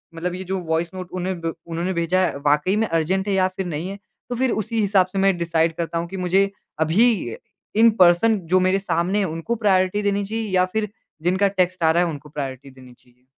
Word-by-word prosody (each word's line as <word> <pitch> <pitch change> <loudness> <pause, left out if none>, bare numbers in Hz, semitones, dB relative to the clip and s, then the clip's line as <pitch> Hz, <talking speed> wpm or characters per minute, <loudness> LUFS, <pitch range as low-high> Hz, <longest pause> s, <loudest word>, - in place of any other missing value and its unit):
मतलब 175 +2 -3
ये 185 - -6
जो 190 +1 -3
वॉइस 165 +1 0
नोट 185 -1 -7
उन्हें 185 0 -3
ब 165 -1 -2
उन्होंने 170 +3 -2
भेजा 170 +1 +1
है 155 - -3
वाक़ई 150 +6 +3
में - - -1
अर्जेंट 175 +4 0
है 200 - +1
या 190 -1 +3
फिर 190 - -2
नहीं 170 +1 -4
है। 200 - -6 0.3
तो 245 - -2
फिर 255 0 +1
उसी 225 +1 -2
हिसाब 195 -2 +3
से 195 - -1
मैं 195 -2 +3
डिसाइड 165 -1 +1
करता 170 0 -2
हूँ 170 +1 -2
कि 195 - -6
मुझे 195 +2 +3 0.4
अभी 190 - +2
अ, - - -8 0.4
इन 225 +2 +7
पर्सन 190 +5 +4
जो 185 - +6
मेरे 195 +1 +2
सामने 180 +1 0
है 200 - +1
उनको 165 +9 -3
प्रायोरिटी 185 +1 +3
देनी 200 0 0
चाहिए 220 +1 -3
या 185 -1 +3
फिर 220 -1 -1 0.3
जिनका 185 +3 +2
टेक्स्ट 185 -2 0
आ 160 - +5
रहा 170 +2 +3
है 175 - 0
उनको 150 -1 -8
प्रायोरिटी 135 -2 -6
देनी 130 -1 -15
चाहिए। 125 0 -28
185 Hz, 235 wpm, -22 LUFS, 165-195 Hz, 0.4 s, इन